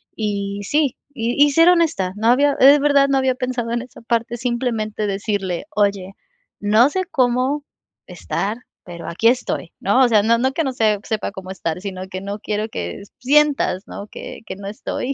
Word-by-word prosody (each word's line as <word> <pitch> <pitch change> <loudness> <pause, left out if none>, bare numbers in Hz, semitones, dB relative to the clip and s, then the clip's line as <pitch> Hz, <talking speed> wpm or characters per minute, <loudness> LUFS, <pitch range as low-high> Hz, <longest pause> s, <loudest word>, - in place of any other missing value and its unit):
Y 200 -2 -3
sí, 285 +3 +1 0.2
y 245 +2 +2
y 290 - +1
ser 330 +4 +6
honesta. 320 - +2
No 220 +2 -1
había 285 +3 +4
es 280 +2 +8
verdad, 280 -1 +4
no 270 -1 +2
había 260 -1 +1
pensado 250 -3 -3
en 240 +1 -1
esa 255 - -14
parte 235 0 -1
simplemente 235 -3 -2
decirle: 195 -1 -2
"Oye, 200 -2 0 0.5
no 215 +5 +4
sé 375 +4 -2
cómo 260 +1 +1 0.4
estar, 210 +3 -3 0.3
pero 170 -1 -9
aquí 200 +7 +1
estoy", 240 -8 0
¿no? 230 +7 +3
O - - +4
sea, 215 -3 +4
no 230 +1 +3
no 265 +2 +1
que 325 - 0
no 265 -3 -2
se 215 -4 +2
sepa 215 -2 -3
cómo 190 -1 -8
estar, 180 -2 -4
sino 190 -2 -6
que 185 0 -6
no 200 +1 -5
quiero 215 +1 -2
que 200 - -5 0.2
sientas, 280 -7 +2
¿no? 205 - -8
que - - -9
que 190 - -5
no 200 0 -8
estoy. 245 +5 -4
230 Hz, 190 wpm, -20 LUFS, 200-265 Hz, 0.5 s, es